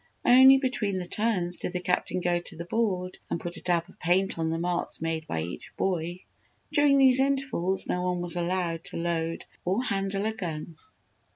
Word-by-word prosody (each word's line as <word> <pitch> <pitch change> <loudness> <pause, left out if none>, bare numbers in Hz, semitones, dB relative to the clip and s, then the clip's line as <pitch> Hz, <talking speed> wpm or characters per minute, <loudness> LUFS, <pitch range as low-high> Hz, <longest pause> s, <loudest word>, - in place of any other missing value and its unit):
Only 260 +2 +8
between 245 -7 -1
the 180 - -3
turns 180 -3 -1
did 180 - -5
the 180 - -1
Captain 180 0 -1
go 175 0 +1
to 175 - -7
the 170 +1 -6
board 185 -3 -1
and - - -1
put 175 +1 -6
a - - -7
dab 170 -1 0
of 190 - -19
paint 180 +1 +1
on 160 0 0
the 165 - -1
marks 175 +1 -2
made 160 -1 -3
by 80 -1 -2
each 85 - -8
boy. 175 -1 -1 0.5
During 290 -2 +4
these 265 -1 +6
intervals 270 -9 0
no 180 - -1
one 180 0 -1
was 175 0 -1
allowed 175 -1 -1
to - - -5
load 165 -1 -2 0.2
or 195 +8 0
handle 195 -2 -1
a 220 - 0
gun. 165 -5 -6
180 Hz, 195 wpm, -27 LUFS, 170-210 Hz, 0.5 s, Only